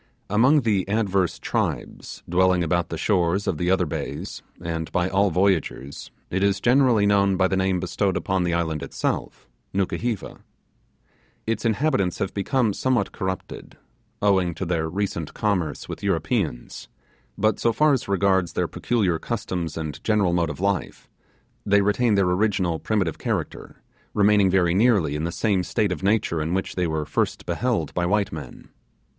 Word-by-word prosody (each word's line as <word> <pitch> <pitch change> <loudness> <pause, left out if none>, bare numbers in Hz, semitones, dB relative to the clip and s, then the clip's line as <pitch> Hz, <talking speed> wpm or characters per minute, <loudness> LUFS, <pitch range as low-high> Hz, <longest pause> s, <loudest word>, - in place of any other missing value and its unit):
Among 130 +8 +4
the 100 -5 0
adverse 100 -4 +1
tribes - - -3
dwelling 90 0 +3
about 85 +1 0
the 80 - -4
shores 95 +1 +1
of 80 - -1
the 90 - 0
other 95 -1 +3
bays, 75 - -5 0.2
and 80 -1 -4
by 90 0 +1
all 100 +2 +2
voyagers, 85 -7 -1 0.2
it 95 - 0
is 100 0 +2
generally 125 -4 +4
known 100 -1 +3
by 95 0 +3
the 95 - -1
name 95 -1 +1
bestowed 95 0 -1
upon 95 -1 0
the 85 - 0
island 80 -3 -1
itself - - -3 0.3
Nukuheva. 105 +3 -2 1.1
Its 115 +1 -2
inhabitants 115 - +1
have 95 - -3
become 110 +2 +1
somewhat 130 +2 0
corrupted, 95 -2 -6 0.5
owing 95 -4 +2
to 95 - -4
their 80 -2 -1
recent 90 -4 -3
commerce 90 -8 -1
with - - -7
Europeans, 95 - -2 0.5
but 110 0 +1
so 115 - +2
far 150 +5 +3
as 130 - -1
regards 95 -2 +1
their - - 0
peculiar 100 -9 0
customs 90 -8 -4
and 80 -4 -5
general 105 -5 +2
mode 85 -2 +1
of 75 - -6
life, 100 -2 -2 0.6
they 100 0 +3
retain 105 +2 +2
their 100 -1 +3
original 90 -2 +1
primitive 100 -7 -1
character, - - -4 0.3
remaining 105 -1 +4
very 90 -2 +3
nearly 100 -7 +3
in 75 +2 -2
the 85 - -2
same 100 0 +1
state 100 +2 0
of 85 - -3
nature 100 -5 +1
in 80 +4 -1
which 95 - -2
they 90 -2 0
were 80 -1 -2
first - - -1
beheld 115 - -1
by 90 - -1
white 100 +3 +1
men. - - -9
95 Hz, 160 wpm, -24 LUFS, 85-105 Hz, 1.1 s, Among